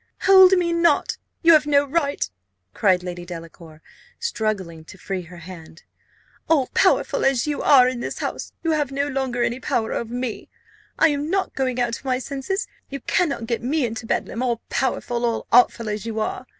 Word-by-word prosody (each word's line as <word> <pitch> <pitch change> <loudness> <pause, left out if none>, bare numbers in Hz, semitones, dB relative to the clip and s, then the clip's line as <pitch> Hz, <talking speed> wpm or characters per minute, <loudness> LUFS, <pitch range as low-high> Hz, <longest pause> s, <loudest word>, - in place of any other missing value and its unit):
"Hold 380 -1 +8
me 350 -2 +2
not 335 0 +2 0.2
you 330 0 +7
have 305 -1 +4
no 285 -1 +4
right," 285 0 -1 0.5
cried 185 -3 +2
Lady 175 -1 -6
Delacour, 165 -2 -11 0.3
struggling 210 - -3
to 190 - -13
free 195 -1 -4
her 175 0 -12
hand. 170 -1 -12 0.7
"All 290 -6 +3
powerful - - +2
as 270 -3 +2
you 295 -1 -2
are 255 -3 +6
in 255 -1 -2
this - - -5
house, - - -4
you 330 - +1
have 295 -3 0
no 280 +1 -1
longer 265 -3 -1
any 240 +1 -1
power 225 -3 -1
over 230 -1 -4
me! 245 -2 -4 0.5
I - - +5
am 290 +1 -2
not 385 +1 -1
going 255 -2 -1
out 240 -1 0
of - - -22
my 255 -1 +1
senses! 280 - -3 0.2
You 275 -1 -6
cannot 280 - 0
get 235 0 -2
me 275 +3 0
into 230 0 -5
Bedlam, 230 - -2
all 240 -3 -1
powerful, 245 -2 -1
all 230 -1 -1
artful 235 -1 +4
as 210 -1 -3
you 220 -1 -3
are. 215 - -3
250 Hz, 190 wpm, -22 LUFS, 215-290 Hz, 0.7 s, Hold